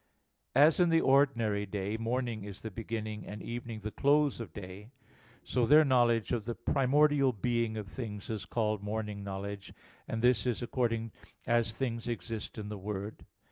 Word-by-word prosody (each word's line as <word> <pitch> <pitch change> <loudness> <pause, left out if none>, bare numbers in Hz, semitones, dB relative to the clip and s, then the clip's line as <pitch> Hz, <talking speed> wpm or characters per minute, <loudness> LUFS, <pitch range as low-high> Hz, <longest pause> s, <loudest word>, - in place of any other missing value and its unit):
As 150 +5 +6
in 175 -1 +5
the 165 0 +5
ordinary 115 -8 +3
day, 100 +1 -3
morning 115 -1 -2
is 100 -1 -8
the 110 - -6
beginning, 110 0 -4
and 105 - -6
evening 115 -2 -5
the 110 +1 -4
close 145 +1 +3
of 110 -8 -6
day, 100 +3 -9 0.5
so, 125 +1 0
their 155 +1 +7
knowledge 120 -5 +3
of 115 -4 -1
the 120 0 -3
primordial 140 0 +3
being 115 0 -1
of 105 -2 -5
things 105 -3 -6
is 110 -3 -4
called 110 -3 -1
morning 105 -1 -4
knowledge; 100 0 -6 0.3
and 115 +1 -3
this 125 -1 +4
is 120 0 -1
according 115 -2 -1 0.3
as 115 -2 +2
things 115 -1 -3
exist 115 -2 -5
in 105 -1 -5
the 105 -1 -6
Word. 100 +1 -6
115 Hz, 170 wpm, -31 LUFS, 105-125 Hz, 0.5 s, their